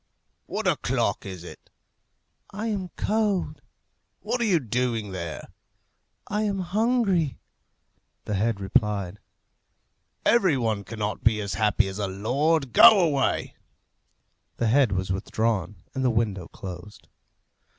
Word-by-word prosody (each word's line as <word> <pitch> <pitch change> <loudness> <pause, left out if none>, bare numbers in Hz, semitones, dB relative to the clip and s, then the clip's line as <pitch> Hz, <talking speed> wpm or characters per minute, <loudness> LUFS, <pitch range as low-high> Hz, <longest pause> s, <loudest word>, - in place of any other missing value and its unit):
"What - - -4
o'clock - - 0
is 95 -3 -7
it?" - - -12 0.8
"I 210 +3 -5
am 195 -4 -3
cold." 210 -3 0 0.6
"What 245 - -2
are - - +2
you 185 -6 +3
doing 120 -4 -2
there?" 85 -4 -6 0.8
"I 210 +2 -1
am 205 -2 0
hungry." 195 - +1 0.9
The 105 - -3
head 105 +1 0
replied, 100 -1 0 1.1
"Every 190 - +4
one 110 -4 -1
cannot 105 -2 -4
be 110 -1 +3
as 100 -1 -3
happy 110 -1 +2
as 95 +1 -6
a 100 - -1
lord. 135 +8 0
Go 220 -3 +9
away." 150 -6 +1 1.0
The 115 - +1
head 130 -1 +4
was 95 -1 -1
withdrawn 105 0 -2
and 135 - -2
the 130 - +3
window 105 -6 -1
closed. 95 +2 -10
115 Hz, 125 wpm, -25 LUFS, -, 1.1 s, Go